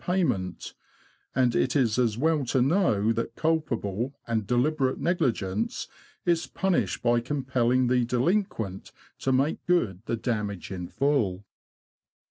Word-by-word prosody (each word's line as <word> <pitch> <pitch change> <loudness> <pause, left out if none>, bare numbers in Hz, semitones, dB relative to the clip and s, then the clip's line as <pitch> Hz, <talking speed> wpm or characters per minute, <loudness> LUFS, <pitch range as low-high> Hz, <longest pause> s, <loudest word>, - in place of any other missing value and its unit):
payment; 125 - -1 0.6
and 125 -2 +3
it 130 - +1
is 125 -4 +2
as 115 -3 +1
well 155 +2 +2
to 130 +1 0
know 125 - +2
that 115 0 -3
culpable 135 -7 -1
and 110 -4 -1
deliberate 130 +2 +1
negligence 115 - -1 0.4
is 170 -1 +1
punished 190 -2 0
by 120 0 +3
compelling 130 -1 +1
the 125 0 +2
delinquent 125 - -1 0.3
to 135 - 0
make 135 +4 +1
good 115 - +1
the 115 - -1
damage 105 -6 -3
in 90 -2 -5
full. 110 -10 0
125 Hz, 125 wpm, -27 LUFS, 110-145 Hz, 0.6 s, and